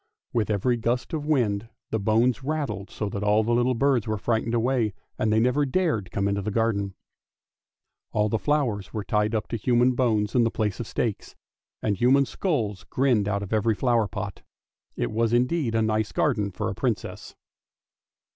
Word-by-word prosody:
With 115 Hz, -3 st, 0 dB
every 110 Hz, +4 st, +1 dB
gust 120 Hz, +5 st, -1 dB
of 150 Hz, -2 st, -3 dB
wind 115 Hz, -7 st, +1 dB, 0.2 s
the 110 Hz, -, 0 dB
bones 115 Hz, +5 st, +2 dB
rattled 145 Hz, -9 st, -3 dB
so 105 Hz, -, -4 dB
that 100 Hz, -, -4 dB
all 105 Hz, +1 st, +3 dB
the 120 Hz, +2 st, 0 dB
little 120 Hz, +1 st, +2 dB
birds 130 Hz, -3 st, +2 dB
were 110 Hz, 0 st, -1 dB
frightened 115 Hz, +2 st, 0 dB
away 120 Hz, -3 st, +1 dB, 0.2 s
and 110 Hz, -, +1 dB
they 110 Hz, -, +4 dB
never 125 Hz, +5 st, +2 dB
dared 140 Hz, -, 0 dB
come 100 Hz, +1 st, -1 dB
into 100 Hz, 0 st, 0 dB
the 105 Hz, -, -3 dB
garden; 100 Hz, -3 st, 0 dB, 1.2 s
all 105 Hz, 0 st, +2 dB
the 110 Hz, +1 st, 0 dB
flowers 125 Hz, -10 st, 0 dB
were 105 Hz, -, -2 dB
tied 105 Hz, +2 st, 0 dB
up 110 Hz, -, -1 dB
to 115 Hz, -, -2 dB
human 120 Hz, +3 st, +3 dB
bones 110 Hz, -4 st, +1 dB
in 125 Hz, -, +4 dB
the 115 Hz, -, +2 dB
place 105 Hz, -3 st, -2 dB
of 120 Hz, -, -4 dB
stakes, 110 Hz, -4 st, -3 dB, 0.5 s
and 105 Hz, -3 st, 0 dB
human 130 Hz, +5 st, +4 dB
skulls 115 Hz, -, -2 dB
grinned 125 Hz, -6 st, +1 dB
out 100 Hz, -1 st, -1 dB
of 100 Hz, -, -5 dB
every 110 Hz, 0 st, +2 dB
flower 120 Hz, -2 st, +2 dB
pot. 100 Hz, +2 st, -6 dB, 0.5 s
It -, -, -2 dB
was 115 Hz, +1 st, +1 dB
indeed 125 Hz, 0 st, +1 dB
a 110 Hz, -, +3 dB
nice 110 Hz, -1 st, 0 dB
garden 105 Hz, -2 st, +1 dB
for 90 Hz, -, -3 dB
a -, -, -2 dB
Princess. -, -, -3 dB
115 Hz, 185 wpm, -25 LUFS, 105-125 Hz, 1.2 s, they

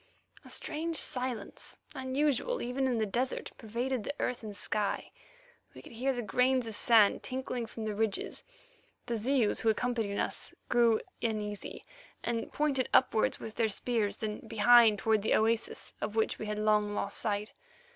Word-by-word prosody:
A -, -, -13 dB
strange 325 Hz, +2 st, -3 dB
silence, 250 Hz, -7 st, -2 dB, 0.2 s
unusual 280 Hz, -, 0 dB
even 260 Hz, +2 st, 0 dB
in 250 Hz, -2 st, 0 dB
the 220 Hz, -, +1 dB
desert, 245 Hz, +6 st, -2 dB
pervaded 240 Hz, +2 st, -2 dB
the 285 Hz, -, -4 dB
earth 250 Hz, -1 st, -1 dB
and 210 Hz, -2 st, -8 dB
sky; 205 Hz, +1 st, -2 dB, 0.6 s
we -, -, -11 dB
could -, -, -12 dB
hear 250 Hz, +4 st, 0 dB
the 245 Hz, -2 st, -3 dB
grains 250 Hz, +4 st, +2 dB
of 225 Hz, -, -4 dB
sand 220 Hz, -2 st, +5 dB
trickling 255 Hz, -2 st, -3 dB
from 220 Hz, 0 st, -6 dB
the 215 Hz, -, -2 dB
ridges. 215 Hz, -1 st, -2 dB, 0.6 s
The 235 Hz, -, -2 dB
Zeus, 235 Hz, 0 st, +1 dB
who 225 Hz, -, +2 dB
accompanied 220 Hz, -2 st, 0 dB
us, -, -, -2 dB
grew 235 Hz, -2 st, +4 dB, 0.2 s
uneasy, 210 Hz, -3 st, -3 dB, 0.4 s
and 230 Hz, -1 st, -2 dB
pointed 280 Hz, -4 st, 0 dB
upward 240 Hz, -4 st, +3 dB
with 220 Hz, -, -8 dB
their 225 Hz, -2 st, +2 dB
spears, 215 Hz, 0 st, -1 dB
then 215 Hz, -1 st, -4 dB
behind 225 Hz, -1 st, +6 dB
toward 220 Hz, +1 st, +2 dB
the 215 Hz, -, +2 dB
oasis 225 Hz, +1 st, 0 dB
of 215 Hz, -, -3 dB
which 220 Hz, -, +1 dB
we 215 Hz, -, -4 dB
had 210 Hz, 0 st, -2 dB
long 210 Hz, -1 st, +2 dB
lost 200 Hz, -1 st, -2 dB
sight. 210 Hz, -1 st, -2 dB
230 Hz, 165 wpm, -31 LUFS, 215-250 Hz, 0.6 s, behind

